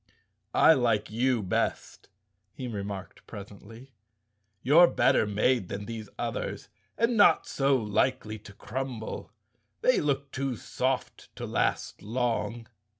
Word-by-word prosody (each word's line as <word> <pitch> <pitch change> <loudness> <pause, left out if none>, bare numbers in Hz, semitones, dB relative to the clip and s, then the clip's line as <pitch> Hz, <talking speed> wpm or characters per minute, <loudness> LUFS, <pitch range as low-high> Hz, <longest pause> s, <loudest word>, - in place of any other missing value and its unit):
"I 160 - +7
like 115 -6 +1
you 120 0 +1
best," 95 - -2 0.5
he 130 - -5
remarked 100 -4 -6
presently. 110 +5 -11 0.7
"You're 165 +6 +7
better 130 -9 +3
made 105 0 +1
than 100 +1 -5
these 110 -2 -7
others - - -4 0.3
and 230 +1 +2
not 205 -6 +5
so 135 0 +2
likely 110 0 0
to 105 0 -13
crumble. 120 0 -5 0.5
They 255 - +3
look 140 -1 -1
too 135 -1 -2
soft 130 +3 -3
to - - -5
last - - -1
long." 115 +1 -2
120 Hz, 120 wpm, -28 LUFS, 105-135 Hz, 0.7 s, I